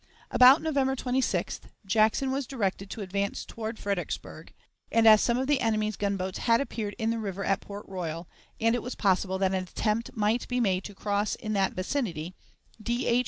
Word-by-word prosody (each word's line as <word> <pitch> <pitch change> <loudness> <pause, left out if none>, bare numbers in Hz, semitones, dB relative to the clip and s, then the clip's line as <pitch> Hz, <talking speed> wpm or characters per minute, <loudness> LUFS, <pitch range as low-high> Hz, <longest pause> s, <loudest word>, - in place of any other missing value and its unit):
About 260 +5 +7
November 275 -4 +1
26th 255 0 -1 0.3
Jackson 220 +6 +2
was 270 -1 -2
directed 195 -6 -2
to 220 - -6
advance 200 +1 -2
toward 225 0 -6
Fredericksburg, 200 -3 -4 0.4
and, 230 0 +3
as 215 -1 +8
some 235 0 +2
of 260 - 0
the 280 -2 +2
enemy's 215 -2 0
gunboats 195 -2 -2
had 230 -1 +3
appeared 220 -7 -3
in 225 -1 0
the 230 - -2
river 200 -2 -4
at 195 0 +1
Port 205 +1 -9
Royal, 170 -3 -5 0.3
and 230 0 +3
it 245 - 0
was 250 - -6
possible 190 -1 +1
that 190 0 +1
an 190 - +1
attempt 215 +5 -2
might 215 +3 +1
be 250 0 -1
made 190 -5 +1
to 205 - -8
cross 205 +1 -1
in 215 -2 -4
that 195 -2 +1
vicinity, 185 - -3 0.5
D. 235 +3 -1
H. 235 - +3
215 Hz, 190 wpm, -28 LUFS, 195-240 Hz, 0.5 s, as